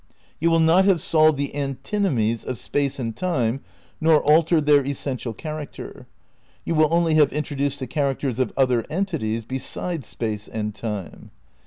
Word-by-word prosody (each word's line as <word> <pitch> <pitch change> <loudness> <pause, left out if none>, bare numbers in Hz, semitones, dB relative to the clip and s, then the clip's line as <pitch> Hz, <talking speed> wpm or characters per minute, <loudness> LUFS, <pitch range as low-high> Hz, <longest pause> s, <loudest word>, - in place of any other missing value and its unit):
You 165 - +2
will 165 0 +3
not 165 +4 +5
have 195 -4 +4
solved 155 -2 +3
the 140 0 -3
antinomies 135 - -1
of 130 - -4
Space 140 +3 -2
and 115 -4 -4
Time 135 -8 -1 0.4
nor 155 -1 +4
altered 155 +1 +4
their 145 -1 +5
essential 135 -3 -3
character; 155 +5 -8 0.6
you - - -1
will 155 -1 +3
only 170 -1 +3
have 150 -3 +5
introduced 145 -2 -2
the 130 - -3
characters 135 -1 -1
of 130 - +1
other 125 -4 +3
entities 150 - -2
beside 140 +5 -4
Space 110 -2 -4
and 105 -1 -4
Time. 105 -4 -6
140 Hz, 155 wpm, -23 LUFS, 125-160 Hz, 0.6 s, not